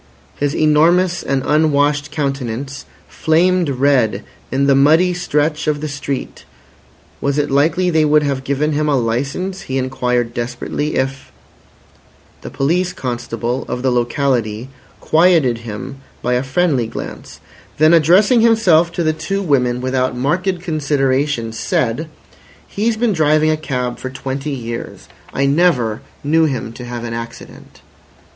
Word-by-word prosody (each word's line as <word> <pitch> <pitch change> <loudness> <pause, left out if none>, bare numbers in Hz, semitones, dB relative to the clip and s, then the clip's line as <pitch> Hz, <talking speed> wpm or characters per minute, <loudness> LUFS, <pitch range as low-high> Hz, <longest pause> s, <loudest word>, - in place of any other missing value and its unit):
His 145 0 -1
enormous 170 +4 +3
and 135 -1 -1
unwashed 150 -1 +2
countenance 135 -2 -4 0.2
flamed 175 +1 +2
red 125 -6 +1 0.3
in 135 +1 +1
the 140 - +4
muddy 160 +7 +4
stretch 150 -3 -1
of 150 -1 +1
the 155 - -4
street. 140 -2 -5 0.8
Was 140 0 0
it 145 -1 0
likely 165 +6 +2
they 160 -1 +3
would 150 0 +3
have 140 -2 -2
given 140 +3 0
him 150 0 0
a 140 - +2
licence, 135 +11 -2
he 130 - -1
inquired 125 -2 -1
desperately, 125 +5 -3
if— 135 0 -3 1.1
The - - -7
police 175 +6 0
constable 120 -1 -3
of 125 - -4
the 130 - +2
locality 120 -2 -1 0.3
quieted 160 -8 +3
him 115 +4 -7 0.3
by 125 - +1
a 125 - +1
friendly 135 -3 0
glance; - - -8 0.4
then 155 +2 +5
addressing 185 - +5
himself 185 -8 +4
to 170 - -1
the 155 -1 +1
two 195 +6 -3
women 125 -6 +1
without 130 -1 -1
marked 180 +7 -1
consideration, 140 -6 0
said: 120 +6 -1 0.6
"He's 220 +2 -1
been 230 -2 +1
driving 155 -1 +3
a - - +2
cab 125 -5 -3
for 130 - -5
twenty 135 +2 -5
years. 120 -4 -6 0.2
I 140 - 0
never 140 -8 +2 0.2
knew 160 +3 +3
him 125 -6 -3
to 125 - -9
have 120 -1 -6
an 115 -1 -4
accident." 115 0 -9
140 Hz, 140 wpm, -17 LUFS, 125-160 Hz, 1.1 s, then